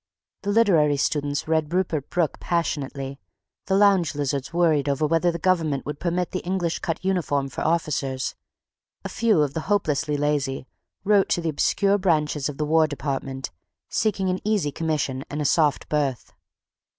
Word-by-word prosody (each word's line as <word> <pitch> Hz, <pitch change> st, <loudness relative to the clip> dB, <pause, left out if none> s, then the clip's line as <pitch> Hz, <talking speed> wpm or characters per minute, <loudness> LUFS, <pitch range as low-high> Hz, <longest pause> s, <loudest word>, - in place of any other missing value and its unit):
The 200 Hz, -, -4 dB
literary 170 Hz, -10 st, +4 dB
students 145 Hz, +1 st, -1 dB
read 160 Hz, -1 st, 0 dB
Rupert 170 Hz, -6 st, -1 dB
Brooke 170 Hz, -4 st, 0 dB
passionately; 140 Hz, -5 st, -2 dB, 0.5 s
the 190 Hz, -, +2 dB
lounge 195 Hz, -6 st, +4 dB
lizards 140 Hz, -2 st, -2 dB
worried 160 Hz, -4 st, +2 dB
over 140 Hz, +2 st, +1 dB
whether 165 Hz, +3 st, +2 dB
the 170 Hz, -, -4 dB
government 165 Hz, -5 st, 0 dB
would 145 Hz, 0 st, -5 dB
permit 175 Hz, 0 st, -1 dB
the 185 Hz, -, -2 dB
English 175 Hz, -2 st, -2 dB
cut 170 Hz, +2 st, -4 dB
uniform 150 Hz, -7 st, 0 dB
for -, -, -6 dB
officers; 145 Hz, -5 st, -1 dB, 0.7 s
a -, -, -3 dB
few 220 Hz, -9 st, +2 dB
of 140 Hz, -2 st, -2 dB
the -, -, -2 dB
hopelessly 155 Hz, -7 st, +1 dB
lazy 145 Hz, -3 st, -1 dB, 0.4 s
wrote 205 Hz, -1 st, +3 dB
to 175 Hz, -, +1 dB
the 165 Hz, -, -1 dB
obscure 200 Hz, +6 st, +2 dB
branches 150 Hz, -6 st, +1 dB
of 140 Hz, -, -7 dB
the 150 Hz, -, -1 dB
War 160 Hz, +1 st, +4 dB
Department, 135 Hz, -, -4 dB, 0.4 s
seeking 200 Hz, -3 st, 0 dB
an 185 Hz, -, -2 dB
easy 205 Hz, -9 st, +1 dB
commission 145 Hz, -4 st, -2 dB
and 145 Hz, -, -4 dB
a 150 Hz, -, -1 dB
soft 150 Hz, 0 st, +2 dB
berth. 140 Hz, -5 st, -2 dB
155 Hz, 165 wpm, -24 LUFS, 145-180 Hz, 0.7 s, literary